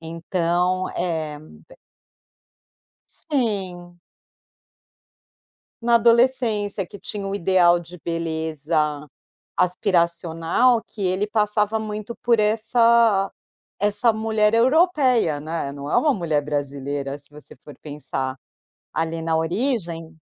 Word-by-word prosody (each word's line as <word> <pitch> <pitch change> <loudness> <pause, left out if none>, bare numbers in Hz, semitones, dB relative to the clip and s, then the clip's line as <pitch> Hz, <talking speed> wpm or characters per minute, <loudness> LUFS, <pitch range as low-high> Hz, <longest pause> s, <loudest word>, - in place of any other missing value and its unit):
Então, 175 +2 -1
é 160 -4 -2 0.3
be - - -16 1.3
Sim. 190 - -3 1.8
Na 235 0 +4
adolescência, 230 -4 +2
que - - -11
tinha 200 0 -6
o 195 - -3
ideal 175 -2 +3
de 175 +1 -12
beleza 160 -2 -2 0.5
aspiracional 175 +4 +2
que 210 - -8
ele 185 +3 0
passava 210 0 +1
muito 215 +1 -5
por 235 -1 +3
essa 225 -1 +3 0.5
essa 210 +3 +3
mulher 220 0 +1
europeia, 255 - +3
né, 155 -2 -4
não 140 +1 -7
é - - +2
uma 300 -3 +3
mulher 160 -6 0
brasileira, 140 -1 -4
se 140 - -22
você 150 -2 -14
for 145 +3 -14
pensar, 135 -3 -4 0.6
ali 165 0 -2
na 160 0 0
origem. 170 -3 -2
180 Hz, 105 wpm, -22 LUFS, 160-220 Hz, 1.8 s, Na